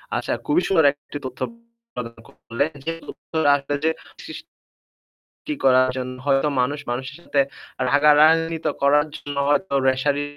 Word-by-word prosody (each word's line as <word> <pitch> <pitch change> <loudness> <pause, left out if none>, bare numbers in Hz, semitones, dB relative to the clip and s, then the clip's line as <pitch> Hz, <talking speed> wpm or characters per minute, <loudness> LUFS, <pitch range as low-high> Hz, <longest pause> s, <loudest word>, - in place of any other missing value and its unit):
আচ্ছা - - -2
খুবই 310 +4 +2
সুন্দর 160 -6 +3
একটি 145 0 -10
তথ্য 130 -1 -7 0.5
প্রদান 115 -1 -7
করলেন। 130 +6 -3 0.2
যে 165 - -1 0.2
তথ্যটা 160 -3 -2
আসলে 140 +1 -3
যে - - +4 0.4
শিস - - -7 1.1
কি 305 - -1
করার 130 -1 +5
জন্য 130 0 -4
হয়তো 135 +1 +3
মানুষ, 140 +4 -1
মানুষের 130 +3 -4
সাথে 145 - -1 0.5
রাগারাগি 155 +3 +5
তো - - +3
করার 145 +2 +4
জন্য 145 0 -7
হয়তো 145 +3 +1
রেশারি 140 +2 +1
145 Hz, 145 wpm, -22 LUFS, 130-155 Hz, 1.1 s, করার